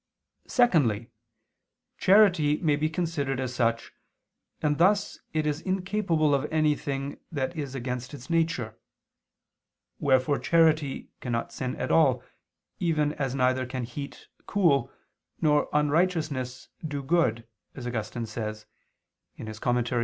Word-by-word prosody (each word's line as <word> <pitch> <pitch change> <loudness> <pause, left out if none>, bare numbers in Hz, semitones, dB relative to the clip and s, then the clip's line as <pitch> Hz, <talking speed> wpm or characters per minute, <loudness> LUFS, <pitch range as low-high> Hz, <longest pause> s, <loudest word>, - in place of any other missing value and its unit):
xiv). - - -40
Secondly, 140 - +3 0.9
charity 185 -7 +5
may 155 -4 +2
be 155 +2 0
considered 155 -5 -2
as 130 -2 -3
such, 115 -2 0 0.7
and 150 0 0
thus 200 +4 +3
it 155 -1 0
is 150 +1 -1
incapable 185 -5 +1
of 140 +3 0
anything 145 -3 0
that 145 +1 -2
is 140 -4 -4
against 125 0 -4
its 140 -3 -10
nature. 165 -10 -1 1.2
Wherefore 135 0 +2
charity 155 -1 +2
cannot 115 -2 -3
sin 130 -1 -3
at - - -3
all, 130 -6 +4 0.6
even 150 -3 +1
as 135 -3 -2
neither 130 -1 +1
can 130 -1 -4
heat 140 +4 -7 0.2
cool, 165 - +2 0.5
nor 150 -1 +2
unrighteousness 150 -4 0
do 145 -3 -4
good, 125 -8 +1 0.3
as 130 - -7
Augustine 115 0 -3
says 110 -1 -5 0.7
(De - - -8
Serm. 120 +3 -1
145 Hz, 125 wpm, -27 LUFS, 125-160 Hz, 1.2 s, charity